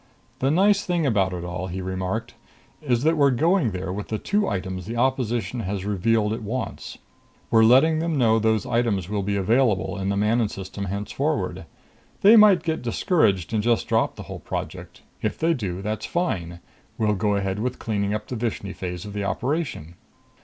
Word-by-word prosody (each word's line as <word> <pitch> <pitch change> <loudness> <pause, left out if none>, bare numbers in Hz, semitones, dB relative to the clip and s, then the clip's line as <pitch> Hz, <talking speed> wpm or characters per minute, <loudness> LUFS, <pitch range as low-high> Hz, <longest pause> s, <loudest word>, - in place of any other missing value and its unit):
"The 135 - +1
nice 200 +6 +3
thing 175 -3 0
about 100 -7 +2
it 90 -1 -5
all," 90 +1 -4
he 95 +1 -5
remarked, 95 +5 -3 0.5
"is 125 -4 0
that 160 +2 +3
we're 140 -1 +5
going 160 +2 +2
there 95 -1 -4
with 100 +1 -5
the 110 - -2
two 205 - 0
items 95 -2 -4
the 115 - -4
opposition 120 -3 0
has 100 -2 -3
revealed 105 +2 +1
it 115 - -4
wants. 115 +5 -5 0.5
We're 115 -1 +6
letting 135 +8 +5
them 165 -1 -1
know 115 -3 +4
those 110 -1 +1
items 115 -7 0
will 105 -1 -1
be 100 +1 -1
available 105 0 +1
in 95 0 -2
the 100 - 0
Manon 110 +2 +2
System 95 +1 -6
henceforward. 100 +2 -2 0.5
They 210 +4 +8
might 205 -6 +7
get 160 -2 -2
discouraged 115 - +1
and 110 - +2
just 120 +1 +1
drop - - +1
the - - -8
whole - - -8
project. - - -6 0.2
If - - -2
they 165 +1 +2
do, 95 - -4
that's 105 +1 -3
fine. 85 - -2 0.4
We'll 105 -1 +2
go 105 +1 0
ahead 95 0 -1
with 125 +3 -2
cleaning 100 -2 -2
up 105 0 -4
the 125 - -4
Vishni 110 -4 -3
phase 90 -1 -6
of 105 - -8
the 105 -1 -3
operation. 130 - -2
110 Hz, 190 wpm, -24 LUFS, 95-130 Hz, 0.5 s, They